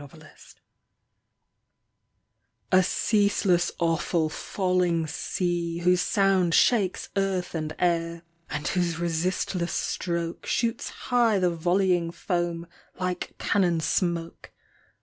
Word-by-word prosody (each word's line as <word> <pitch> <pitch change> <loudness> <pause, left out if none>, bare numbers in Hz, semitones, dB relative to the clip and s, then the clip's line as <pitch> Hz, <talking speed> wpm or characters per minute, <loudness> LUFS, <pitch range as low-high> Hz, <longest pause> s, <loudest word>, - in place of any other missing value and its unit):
NIAGARA 155 +2 -14 2.4
A 185 - +6
ceaseless, 200 -2 +2
awful, 165 -1 +1
falling 180 -2 0
sea, 170 +2 -2
whose 180 0 +4
sound 195 -4 +2
Shakes 205 -7 +2
earth 195 -2 -1
and 155 -2 -3
air, 170 -1 0 0.3
and 150 +3 -3
whose 175 -3 0
resistless 175 +1 -1
stroke 170 -1 -3
Shoots 230 -1 -1
high 240 -4 +1
the 180 -2 +2
volleying 175 +1 +1
foam 175 -1 -2 0.3
like 180 -1 -3
cannon 180 -5 +1
smoke! 170 +1 -2
175 Hz, 95 wpm, -26 LUFS, 170-185 Hz, 2.4 s, A